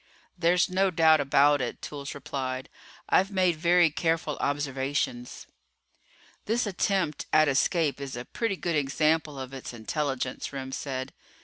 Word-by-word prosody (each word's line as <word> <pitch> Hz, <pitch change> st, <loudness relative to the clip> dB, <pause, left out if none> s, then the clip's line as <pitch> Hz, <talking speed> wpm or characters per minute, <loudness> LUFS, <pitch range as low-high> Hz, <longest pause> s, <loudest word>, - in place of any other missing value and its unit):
"There's 175 Hz, 0 st, +3 dB
no 190 Hz, +1 st, +2 dB
doubt 160 Hz, -2 st, +5 dB
about 145 Hz, +1 st, +4 dB
it," 125 Hz, -, -4 dB
Toolls 140 Hz, -1 st, -7 dB
replied. 130 Hz, -1 st, -4 dB, 0.4 s
"I've 190 Hz, +1 st, +3 dB
made 185 Hz, -4 st, +2 dB
very 170 Hz, 0 st, +4 dB
careful 160 Hz, -1 st, 0 dB
observations." 135 Hz, -3 st, -2 dB, 1.0 s
"This 230 Hz, +3 st, +1 dB
attempt 190 Hz, -5 st, -1 dB
at 155 Hz, 0 st, +5 dB
escape 145 Hz, +1 st, +1 dB
is 135 Hz, -2 st, -5 dB
a 120 Hz, +1 st, -6 dB
pretty 225 Hz, -4 st, -2 dB
good 170 Hz, -3 st, -2 dB
example 150 Hz, +1 st, +1 dB
of 130 Hz, 0 st, -7 dB
its 130 Hz, -2 st, -7 dB
intelligence," 130 Hz, +2 st, -3 dB
Remm 135 Hz, -1 st, -6 dB
said. 130 Hz, -1 st, -4 dB
150 Hz, 135 wpm, -27 LUFS, 135-170 Hz, 1.0 s, doubt